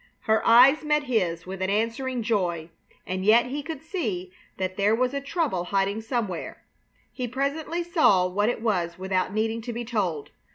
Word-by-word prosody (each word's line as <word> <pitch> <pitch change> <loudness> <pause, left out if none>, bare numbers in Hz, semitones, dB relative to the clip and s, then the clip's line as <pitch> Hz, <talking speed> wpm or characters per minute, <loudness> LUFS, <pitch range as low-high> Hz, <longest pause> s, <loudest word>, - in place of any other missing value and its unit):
Her 220 -1 +2
eyes 255 +7 +7
met 300 -1 +1
his 180 -10 -1
with 190 +1 -7
an 190 - 0
answering 230 +4 -1
joy, 175 -7 -1 0.3
and 185 0 -3
yet 225 +4 +5
he 275 +4 -4
could 310 -1 -7
see 215 - -3 0.3
that 185 0 -3
there 205 +2 +3
was 250 +2 0
a 280 - -2
trouble 280 - -1
hiding 200 +3 0
somewhere. 225 -6 -4 0.5
He 250 -2 -3
presently 290 +7 -2
saw 310 - +3
what 205 +4 0
it 235 -2 -3
was 175 -6 0
without 185 0 -1
needing 220 +2 -1
to 240 +2 -5
be 240 +1 -4
told. 190 -10 -2
220 Hz, 175 wpm, -25 LUFS, 185-260 Hz, 0.5 s, eyes